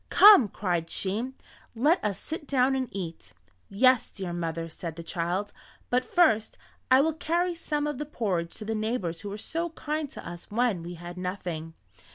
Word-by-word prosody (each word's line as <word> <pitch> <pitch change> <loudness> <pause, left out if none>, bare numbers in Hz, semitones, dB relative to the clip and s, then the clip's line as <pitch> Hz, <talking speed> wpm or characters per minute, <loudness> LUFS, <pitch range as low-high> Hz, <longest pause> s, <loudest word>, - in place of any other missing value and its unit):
"Come," 400 - +9
cried 175 -4 -2
she, 220 +10 -2 0.4
"let 295 +10 +3
us 205 -3 0
sit 315 -2 -6
down 265 -1 +3
and 260 -2 -1
eat." 165 - -6 0.4
"Yes, 255 +4 +4
dear 190 -4 -5
mother," 165 -1 -3
said 165 0 -7
the 170 - -7
child, 175 +4 -2 0.4
"but 250 +1 +3
first 255 -13 +3 0.3
I 260 +1 +7
will 320 +2 +2
carry 345 +3 0
some 300 -3 -2
of 295 -3 -3
the 300 - -2
porridge 185 - -2
to 215 - -7
the 225 - -1
neighbors 215 -6 -2
who 205 - -5
were 200 - -5
so 330 +9 -3
kind 305 -2 -3
to - - -9
us 175 0 -8
when 225 -4 +1
we 175 +1 -7
had 175 +1 -8
nothing." 175 -3 -4
210 Hz, 185 wpm, -28 LUFS, 175-280 Hz, 0.4 s, Come